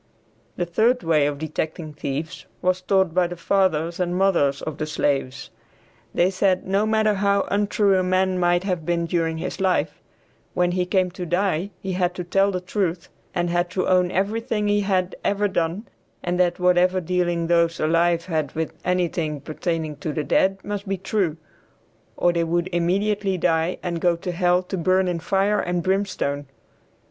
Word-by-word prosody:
The 175 Hz, -, -1 dB
third 230 Hz, +8 st, +2 dB
way 155 Hz, -3 st, +3 dB
of 145 Hz, -1 st, -3 dB
detecting 155 Hz, +1 st, -4 dB
thieves 150 Hz, +4 st, -5 dB
was 185 Hz, 0 st, 0 dB
taught 190 Hz, -2 st, +2 dB
by 180 Hz, 0 st, +3 dB
the 175 Hz, -, -6 dB
fathers 170 Hz, -2 st, +1 dB
and 175 Hz, -1 st, 0 dB
mothers 170 Hz, -8 st, +2 dB
of 155 Hz, -2 st, -5 dB
the 155 Hz, -, -2 dB
slaves. 140 Hz, -2 st, -1 dB, 0.6 s
They 180 Hz, +2 st, +2 dB
said 185 Hz, -1 st, +1 dB
no 200 Hz, +3 st, +1 dB
matter 220 Hz, -1 st, +2 dB
how 200 Hz, 0 st, +1 dB
untrue 205 Hz, 0 st, +2 dB
a -, -, +1 dB
man 185 Hz, 0 st, +1 dB
might 175 Hz, 0 st, +2 dB
have 180 Hz, -4 st, -2 dB
been 170 Hz, +1 st, 0 dB
during 165 Hz, -1 st, -1 dB
his 175 Hz, -, -5 dB
life, 190 Hz, -1 st, 0 dB, 0.5 s
when 180 Hz, -1 st, +2 dB
he 180 Hz, 0 st, -1 dB
came 185 Hz, -1 st, +1 dB
to 180 Hz, 0 st, -6 dB
die 180 Hz, +1 st, 0 dB
he 190 Hz, -, -3 dB
had 180 Hz, -1 st, 0 dB
to 180 Hz, -, -4 dB
tell 195 Hz, +3 st, +2 dB
the 185 Hz, -2 st, -2 dB
truth 185 Hz, -2 st, -2 dB, 0.3 s
and 175 Hz, -1 st, 0 dB
had 175 Hz, 0 st, +1 dB
to 185 Hz, +1 st, -1 dB
own 180 Hz, -1 st, +3 dB
everything 210 Hz, +3 st, -1 dB
he 205 Hz, 0 st, +3 dB
had 185 Hz, -2 st, 0 dB
ever 205 Hz, +1 st, +1 dB
done, 180 Hz, +3 st, -2 dB, 0.4 s
and 175 Hz, +1 st, 0 dB, 0.2 s
whatever 180 Hz, +1 st, +3 dB
dealing 175 Hz, -1 st, 0 dB
those 170 Hz, 0 st, +2 dB
alive 170 Hz, +2 st, +2 dB
had 155 Hz, -5 st, -2 dB
with 160 Hz, 0 st, -3 dB
anything 170 Hz, -4 st, -1 dB
pertaining 155 Hz, 0 st, -3 dB
to 150 Hz, +1 st, -4 dB
the 155 Hz, -, -2 dB
dead, 195 Hz, +5 st, +2 dB
must 205 Hz, 0 st, -5 dB
be 195 Hz, -, 0 dB
true, 185 Hz, -4 st, -1 dB, 0.8 s
or 175 Hz, -, +3 dB
they 170 Hz, -1 st, +1 dB
would 170 Hz, +2 st, 0 dB
immediately 195 Hz, +3 st, +1 dB
die 165 Hz, 0 st, +1 dB
and 170 Hz, -2 st, -3 dB
go 175 Hz, -1 st, +3 dB
to 175 Hz, +2 st, -5 dB
hell 180 Hz, +1 st, +2 dB
to 190 Hz, +1 st, -4 dB
burn 185 Hz, +2 st, +2 dB
in 175 Hz, -2 st, -1 dB
fire 195 Hz, +4 st, +1 dB
and 175 Hz, -1 st, -1 dB
brimstone. 185 Hz, -7 st, -1 dB
180 Hz, 175 wpm, -23 LUFS, 165-190 Hz, 0.8 s, way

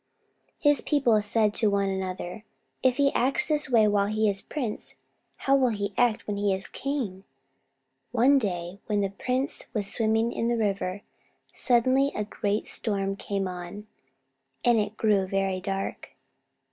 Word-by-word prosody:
His 290 Hz, -1 st, +4 dB
people 245 Hz, -8 st, +2 dB
said 210 Hz, 0 st, +1 dB
to 220 Hz, -, +2 dB
one 200 Hz, -1 st, +1 dB
another, 190 Hz, +1 st, -4 dB, 0.4 s
"If 255 Hz, -1 st, +2 dB
he 280 Hz, -1 st, +3 dB
acts 260 Hz, +3 st, +2 dB
this 300 Hz, -2 st, +1 dB
way 225 Hz, -4 st, +5 dB
while 205 Hz, -1 st, +2 dB
he 215 Hz, +1 st, +1 dB
is 195 Hz, -1 st, 0 dB
a -, -, -21 dB
prince, 250 Hz, -8 st, -5 dB, 0.4 s
how 275 Hz, -, +2 dB
will 260 Hz, -2 st, +3 dB
he 205 Hz, -2 st, -3 dB
act 240 Hz, -3 st, +2 dB
when 205 Hz, -1 st, -3 dB
he 200 Hz, -1 st, +1 dB
is 190 Hz, -, -7 dB
king?" 245 Hz, -10 st, -4 dB, 0.9 s
One 255 Hz, +4 st, +4 dB
day 180 Hz, -3 st, -3 dB
when 210 Hz, -2 st, +1 dB
the 195 Hz, -1 st, -1 dB
prince 255 Hz, +6 st, -2 dB
was 205 Hz, -2 st, 0 dB
swimming 225 Hz, 0 st, +1 dB
in 230 Hz, -, -1 dB
the 235 Hz, 0 st, +1 dB
river, 200 Hz, -2 st, -1 dB, 0.5 s
suddenly 260 Hz, +3 st, +3 dB
a 210 Hz, -, -1 dB
great 205 Hz, 0 st, -2 dB
storm 195 Hz, -3 st, -1 dB
came 195 Hz, -1 st, -3 dB
on, 180 Hz, +3 st, -7 dB, 0.8 s
and 240 Hz, -2 st, +5 dB
it 210 Hz, +1 st, -3 dB
grew 205 Hz, -4 st, +2 dB
very 195 Hz, -1 st, 0 dB
dark. 195 Hz, 0 st, -4 dB
210 Hz, 160 wpm, -27 LUFS, 195-245 Hz, 0.9 s, way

